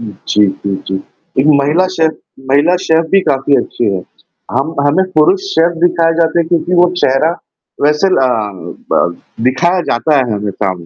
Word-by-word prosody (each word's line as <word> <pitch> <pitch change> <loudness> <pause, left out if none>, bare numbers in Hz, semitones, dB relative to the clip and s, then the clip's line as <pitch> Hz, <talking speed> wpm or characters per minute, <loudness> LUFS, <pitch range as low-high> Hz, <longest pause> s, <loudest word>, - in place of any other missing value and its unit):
हुँ, 110 -3 -7 0.2
जी, 105 - +3
जी, 95 +1 -3
जी, 95 - -2 0.5
एक 140 - +1
महिला 155 +7 +2
शेफ़, 160 -3 +1 0.4
महिला 145 +6 +3
शेफ़ 160 -2 +1
भी 195 - +4
काफ़ी 135 -3 +1
अच्छी 120 - -4
है। 95 -3 -1 0.5
हम 135 +6 -1
हमें 170 +7 +2
पुरुष 265 - +3
शेफ़ 170 +1 +2
दिखाया 165 -1 +2
जाता 165 0 +2
है, - - 0
क्योंकि 175 +1 0
वो 175 0 +4
चेहरा 135 0 +2 0.5
वैसे 150 +6 +2
ल 130 -1 +3 0.6
ब 85 0 +1 0.3
दिखाया 170 +8 +1
जाता 130 +6 +1
है 125 -5 0
हमेशा। 100 -1 -2
150 Hz, 165 wpm, -13 LUFS, 120-170 Hz, 0.6 s, भी